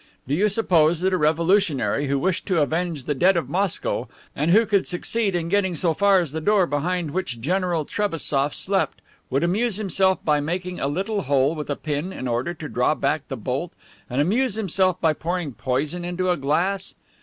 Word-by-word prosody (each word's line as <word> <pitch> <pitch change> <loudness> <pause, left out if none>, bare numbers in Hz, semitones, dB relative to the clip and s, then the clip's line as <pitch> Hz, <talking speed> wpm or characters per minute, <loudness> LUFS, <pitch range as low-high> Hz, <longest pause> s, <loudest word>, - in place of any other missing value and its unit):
Do 135 - -1
you 200 +7 +3
suppose 175 -6 +3
that 190 +1 +1
a - - +3
revolutionary 155 - +2
who 140 +1 +1
wished 180 +6 -1
to 185 -4 +2
avenge 160 -1 -2
the 145 - -1
dead 180 +6 +3
of 170 - -2
Moscow 190 0 -1 0.3
and 150 +4 0
who 220 +6 +5
could 200 -2 +1
succeed 195 +2 0
in 170 -1 -1
getting 190 -1 +1
so 165 +1 +1
far 200 +1 +4
as 170 -6 -2
the 160 +1 -4
door 205 +1 +3
behind 165 +2 -2
which 135 -9 -3
General 175 +3 0
Trebassof 150 -8 -1
slept 195 0 0 0.3
would 135 +3 0
amuse 205 +5 +1
himself 190 -2 +2
by 150 -1 +3
making 180 +4 -3
a 135 - 0
little 195 +8 -1
hole 140 +1 +2
with 150 -2 -6
a 145 - 0
pin 155 +5 -3
in 130 - -5
order 125 +9 -1
to - - -7
draw - - +1
back - - -1
the - - -5
bolt - - -3 0.4
and 125 - -2
amuse 215 - +1
himself 190 -3 +1
by 160 -2 +2
pouring 170 -2 -3
poison 145 +9 -2
into 180 +1 -1
a 175 - +1
glass? 175 +8 -1
175 Hz, 200 wpm, -23 LUFS, 150-190 Hz, 0.4 s, who